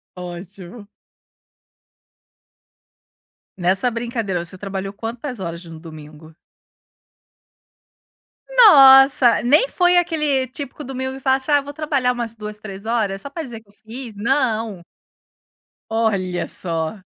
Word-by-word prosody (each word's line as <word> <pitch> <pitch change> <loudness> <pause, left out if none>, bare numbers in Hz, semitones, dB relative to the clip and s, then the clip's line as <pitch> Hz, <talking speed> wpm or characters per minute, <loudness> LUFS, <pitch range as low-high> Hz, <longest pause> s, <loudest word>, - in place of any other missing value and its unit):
Ótimo. 180 +3 -10 2.7
Nessa 190 +7 +1
brincadeira, 230 -6 -3
você 180 +2 -6
trabalhou 195 0 -5
quantas 230 +3 -6
horas 170 -1 -6
no 165 -1 -11
domingo? 155 -1 -13 2.1
Nossa, 270 - +7
nem 295 - +4
foi 355 -5 +2
aquele 300 -6 +1
típico 280 +3 -8
domingo 260 0 -5
que - - -9
fala 265 0 +2
assim: 270 +3 -5
"Ah, 290 -1 +4
vou 285 +1 -9
trabalhar 280 -5 0
umas 235 -2 -5
2, 210 -1 -8
3 200 0 -9
horas 215 -4 -1
só 280 - -8
para 325 +3 -6
dizer 240 -5 -8
que 220 - -33
eu - - -23
fiz.", 225 +2 -10
não. 225 -5 -1 1.1
Olha 200 -6 -1
só. 165 +3 -4
230 Hz, 120 wpm, -20 LUFS, 190-270 Hz, 2.7 s, Nossa